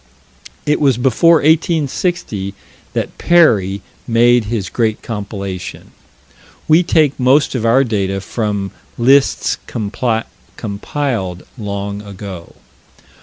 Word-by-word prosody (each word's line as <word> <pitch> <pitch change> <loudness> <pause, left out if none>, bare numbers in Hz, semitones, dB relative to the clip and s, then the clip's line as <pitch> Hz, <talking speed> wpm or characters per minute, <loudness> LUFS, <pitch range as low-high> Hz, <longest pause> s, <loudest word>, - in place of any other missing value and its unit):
It 150 +1 +1
was 135 -5 +3
before 135 +7 +4
1860 155 - 0 0.4
that - - -3
Perrey 100 - +3 0.3
made 120 0 +4
his 105 -3 -2
great 110 0 -1
compilation. 100 -4 -6 0.8
We 160 +2 +6
take 155 -5 +2
most 130 +3 +3
of 115 -3 -1
our 130 +4 +5
data 100 -5 -1
from 100 -1 -3 0.3
lists 135 +3 +3
compiled 110 -1 -3
long 100 -3 -4
ago. 100 -4 -9
115 Hz, 95 wpm, -17 LUFS, 100-135 Hz, 0.8 s, We